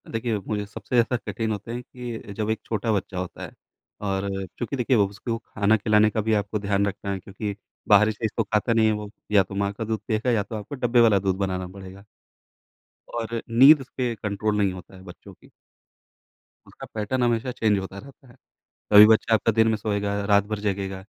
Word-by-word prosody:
देखिए, 115 -1 -2
मुझे 105 -1 -2
सबसे 105 +4 -6
ज़्यादा 120 +1 +3
कठिन 110 -1 -2
होता 105 +2 -5
है 120 +1 -4
कि 125 -1 -8
अ, 105 - -11
जब 105 +1 -3
एक 110 - -1
छोटा 110 0 -1
बच्चा 95 -2 -3
होता 90 0 -5
है। - - -8 0.5
और 100 -1 -2 0.3
क्योंकि 120 +4 -3
देखिए 125 -1 +2
उसको 105 +3 -1
खाना 110 -1 +1
खिलाने 105 +1 +3
का 110 - -1
भी 110 +1 0
आपको 105 0 -1
ध्यान 100 0 0
रखना 100 0 -4
है, 95 - -3
क्योंकि 100 +2 -6 0.3
बाहरी 105 +1 +6
चीज़ 110 0 -3
तो 115 - +2
खाता 105 +2 0
नहीं 115 -1 +3
है - - +3
वो। 105 -1 -5 0.2
या 100 -2 +5
तो 95 +1 -10
माँ 100 0 0
का 110 - -5
दूध 110 0 -2
पिएगा 110 +2 0
या 110 -4 +1
तो 110 - -8
आपको 110 +6 -6
डब्बे 125 -2 +2
वाला 110 -4 +5
दूध 95 -1 0
बनाना 95 -2 -2
पड़ेगा। 95 +1 -12 1.1
और 115 0 -3
नींद 135 +5 +7
पे 125 -2 0
कंट्रोल 105 +1 -1
नहीं 100 -2 +1
होता 90 +1 -12
है 95 - -14
बच्चों 90 -2 -13
की। - - -21 1.2
उसका - - -11
पैटर्न 110 +4 -1
हमेशा 120 +1 0
चेंज 110 -4 +1
होता 95 0 -7
रहता 135 +2 -15
है। 120 - -18 0.6
कभी 105 +1 +10
बच्चा 110 +1 +4
आपका 110 +1 +2
दिन 110 +1 +3
में 110 - +1
सोएगा, 100 -1 -2
रात 100 0 +4
भर 110 0 -3
जगेगा, 95 -2 -3
105 Hz, 210 wpm, -24 LUFS, 100-115 Hz, 1.2 s, कभी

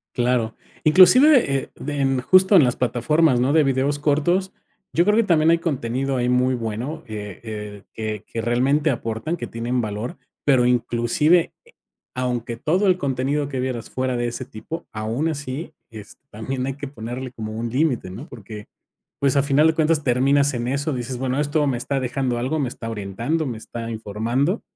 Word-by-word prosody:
Claro, 120 -2 0 0.3
inclusive, 185 - +6
eh, 135 - -5
de 145 0 -5
en 135 -1 +1
justo 185 - +5
en 170 - +8
las 125 -1 +1
plataformas, 125 +4 +2
¿no? 130 +3 +2
De 160 -1 +5
videos 135 +1 0
cortos, 165 +6 +1 0.4
yo 170 - +4
creo 210 +1 +3
que 230 - +5
también 165 -5 +3
hay 170 - +3
contenido 135 -4 -2
ahí 125 0 0
muy 125 +1 +2
bueno, 120 +7 -4
que, 105 0 -7
eh, 110 -2 -4
que 115 - -5
realmente 130 +7 +2
aportan, 120 +6 -2
que - - -5
tienen 120 +2 -2
valor, 110 +4 -4 0.3
pero 130 -4 +4
inclusive 125 +7 +2 0.6
aunque 120 -2 -2
todo 180 - +1
el 185 -1 +3
contenido 140 0 -1
que 135 -2 -4
vieras 125 -3 -3
fuera 130 -1 -1
de 120 - 0
ese 120 +2 -5
tipo, 130 +6 -8
aún 115 +8 -2
así, 145 +1 -5 0.2
es 110 -2 -11
también 125 +4 -4
hay 135 - -3
que 145 +1 -7
ponerle 125 0 -6
como 110 -3 -6
un 115 +2 -4
límite, 130 - 0
¿no? 120 - -9
Porque, 105 - -10 0.5
pues, 140 -1 +2
a 140 - +4
final 145 +2 +4
de 160 - +3
cuentas 155 -1 +1
terminas 140 +3 +3
en 120 0 -2
eso, 140 +2 -1
dices, 125 0 -4
bueno, 130 +1 -2
esto 150 0 +1
me 130 -3 0
está 135 +3 -2
dejando 125 -1 -1
algo, 130 +6 -1
me 135 -4 0
está 115 -1 -7
orientando, 115 +10 -2
me 120 -5 -4
está 115 +1 -7
informando, 115 - -1
130 Hz, 180 wpm, -22 LUFS, 120-150 Hz, 0.6 s, en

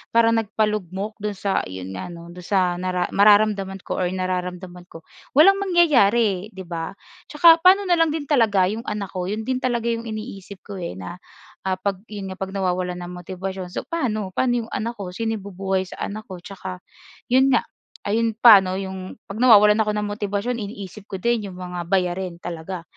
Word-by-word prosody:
parang 230 0 +5
nagpalugmok 210 -1 -2
do'n 210 0 -3
sa 195 0 0
iyon 95 0 -7
nga 90 - -5
'no 170 -1 -10
do'n 180 0 -11
sa 180 -3 +1
nara 180 -1 -1
mararamdaman 200 -2 +3
ko - - -3
or 180 - +1
nararamdaman 180 -1 -4
ko, 165 - -13 0.3
walang 390 +7 +7
mangyayari, 240 - +3
'di 190 - -7
ba? 170 +1 -5 0.3
'Tsaka 330 +2 +6
pa'no 375 +4 +6
na 350 -2 +2
lang 330 - +4
din 305 -1 -2
talaga 225 -10 +3
yung 225 +2 -5
anak 205 -3 -4
ko? 180 -1 -3
'Yon 215 +3 -3
din 255 +1 -1
talaga 240 -3 -1
yung 230 0 -4
iniisip 210 -3 -8
ko, 200 -2 -8
eh, 130 - -5
na, 95 - -8 0.5
ah,' 185 - +1
pag 195 -2 -1
'yon 200 -3 -6
nga 185 - -9
'pag 195 +1 -5
nawawalan 180 -1 -1
ng 175 - -7
motibasyon 185 +1 -6
so, 180 - -5
pa'no, 215 - -2
pa'no 245 +2 +1
yung - - -19
anak 235 +2 -3
ko? 195 -5 -6
Sino 225 +3 -2
bubuhay 190 -1 -2
sa 185 - -11
anak 215 +2 -6
ko? 185 - -7
'Tsaka 185 0 -8 0.5
'yon 260 +2 +4
nga, 250 - +3 0.4
ayun 225 +1 +1
pa 225 -2 +9
'no 185 -1 -3
yung 190 -1 -6
'pag 200 +2 -7
nawawalan 210 -3 +7
ako 215 -1 +2
ng 210 0 -1
motibasyon 205 +3 -2
iniisip 205 -1 -8
ko - - -6
din 235 0 0
yung 180 - -11
mga 180 -1 -6
bayarin 180 -1 0
talaga. 175 +1 -6
200 Hz, 195 wpm, -22 LUFS, 185-225 Hz, 0.5 s, pa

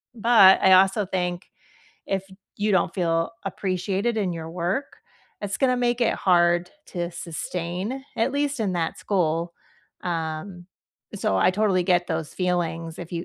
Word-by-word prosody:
but, 220 -4 +6
I 190 - +6
also 195 +2 +4
think 180 -1 -3 0.6
if 195 -1 -1 0.3
you 205 0 0
don't 180 -2 +2
feel 165 -3 0
appreciated 195 +3 -2
in 195 -5 0
your 165 -1 -6
work, 180 +10 -2 0.5
it's 200 -1 -3
gonna 255 -2 +2
make 245 0 0
it 235 - +2
hard 175 -1 +2 0.2
to 175 -2 -4
sustain, 180 +7 -4
at 230 +4 +1
least 285 -2 -1
in 200 -4 0
that 165 -2 -1
school, 170 -3 0 0.5
um, 170 +1 -4 0.5
so, 95 - 0
I 95 - +4
totally 195 -2 +2
get 175 -1 +2
those 160 -3 -3
feelings 170 -3 -2
if 175 0 -8
you 170 0 -3
180 Hz, 150 wpm, -24 LUFS, 170-205 Hz, 0.6 s, but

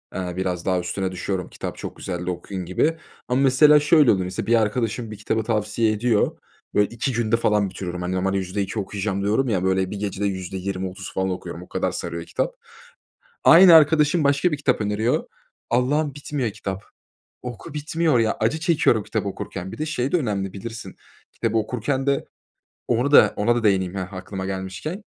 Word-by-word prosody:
eee, 90 -1 -3
biraz 90 -2 -2
daha 95 -1 +1
üstüne 95 +2 -3
düşüyorum, 95 0 -3
"Kitap - - -6
çok - - -7
güzeldi, 90 -1 -4
okuyun." 90 +1 -5
gibi 155 - +1 0.3
ama, 125 +2 +1
mesela, 150 +3 +6
şöyle 150 -2 +5
oluyor. 95 -3 +1
Mesela, 90 - -4
bir 120 - +4
arkadaşım 110 0 -1
bir 105 - -7
kitabı 110 +2 -1
tavsiye 110 0 0
ediyor. 110 0 +1 0.4
Böyle 105 0 +3
2 120 +3 -2
günde 115 0 +1
falan 105 -3 +1
bitiriyorum. 90 -1 -6
Hani, 90 +1 -2
normalde 95 +1 0
%2 95 +3 -3
okuyacağım 100 0 -3
diyorum 110 +5 +1
ya, 95 -4 0
böyle, 95 0 +1
bir 105 - -4
gecede 100 -1 -2
%20-30 95 0 -5
falan 95 0 0
okuyorum. 90 - -5
O - - -15
kadar - - -1
sarıyor 85 -1 -5
kitap. - - -2 0.9
Aynı 170 0 +9
arkadaşım 155 +1 +5
başka 140 +5 +2
bir 150 - -1
kitap 135 -5 +1
öneriyor. 105 +3 0 0.4
Allah’ım, 140 +5 +1
bitmiyor 140 -5 -3
kitap. 100 -1 -6 0.6
Oku, 125 +5 -8
bitmiyor 150 -1 +1
ya. 115 -1 +1
Acı 135 +9 +1
çekiyorum 150 -9 +2
kitabı 105 -1 -3
okurken. 95 -1 -6
Bir - - -9
de 155 - -2
şey 135 -3 -2
de - - +5
önemli, 100 - -2
bilirsin, 110 +3 -8 0.4
kitabı 115 -1 -1
okurken 125 +5 -2
de 140 -1 +1 0.6
Onu 125 +5 +1
da - - +7
ona 115 +3 +2
da 120 - -1
değineyim, 95 -3 +2
heh, 95 0 -5
aklıma 95 0 -6
gelmişken. 95 - -5
105 Hz, 180 wpm, -23 LUFS, 95-130 Hz, 0.9 s, Aynı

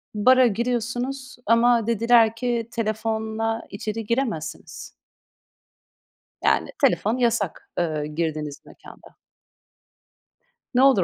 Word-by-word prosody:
bara 255 +4 +5
giriyorsunuz 245 +4 -2
ama 230 0 +3
dediler 230 0 +4
ki; 235 -1 -2
"Telefonla 220 0 -2
içeri 215 +1 -5
giremezsiniz." 220 - -3 1.5
Yani, - - +2 0.2
telefon 230 -2 +1
yasak, 230 -7 -1
ııı, 155 -3 -1
girdiğiniz 150 -2 -3
mekânda. - - -16 1.6
Ne 250 - +4
olur 260 -10 +5
225 Hz, 85 wpm, -23 LUFS, 210-240 Hz, 1.6 s, bara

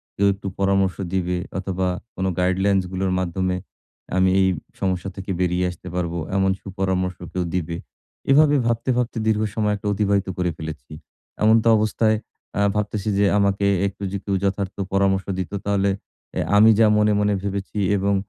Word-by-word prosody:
কেউ 100 - +3
একটু 100 0 -8
পরামর্শ 95 -1 +2 0.2
দিবে 90 -1 0 0.2
অথবা 95 -1 -1 0.3
কোনো 95 0 -1
গাইডলাইনসগুলোর 95 0 +1
মাধ্যমে 95 +1 -1 0.6
আমি 95 0 +4
এই 95 - +4 0.3
সমস্যা 95 -1 -1
থেকে 95 0 -5
বেরিয়ে 90 0 +1
আসতে 90 +1 -12
পারবো! 85 -1 -2 0.2
এমন 95 0 +3
সুপরামর্শ 95 -1 -2 0.2
কেউ 90 - 0
দিবে! 85 -1 -2 0.5
এভাবে 145 +1 +6
ভাবতে, 115 +2 0
ভাবতে 125 -1 -1
দীর্ঘ 110 -1 +2
সময় 105 -2 +1
একটা 105 0 -6
অতিবাহিত 100 -1 +1
করে 90 -1 0
ফেলেছি। 80 -5 -7 0.5
এমতাবস্থায়, 110 0 +4 0.4
আ - - +1 0.2
ভাবতেছি 105 0 -1
যে, 100 - +4
আমাকে 100 0 +2 0.2
একটু 100 +1 -8
যে 100 - -2
কেউ 100 -1 -1
যথার্থ 100 -1 -1 0.2
পরামর্শ 95 -1 +2
দিত, 95 - -3
তাহলে 100 -1 +2 0.5
এ - - +2 0.2
আমি 110 +2 +8
যা 115 - +7
মনে 105 0 +4
মনে 105 0 +2
ভেবেছি 100 +1 -4 0.2
এবং 100 +1 +1
95 Hz, 155 wpm, -22 LUFS, 95-105 Hz, 0.6 s, আমি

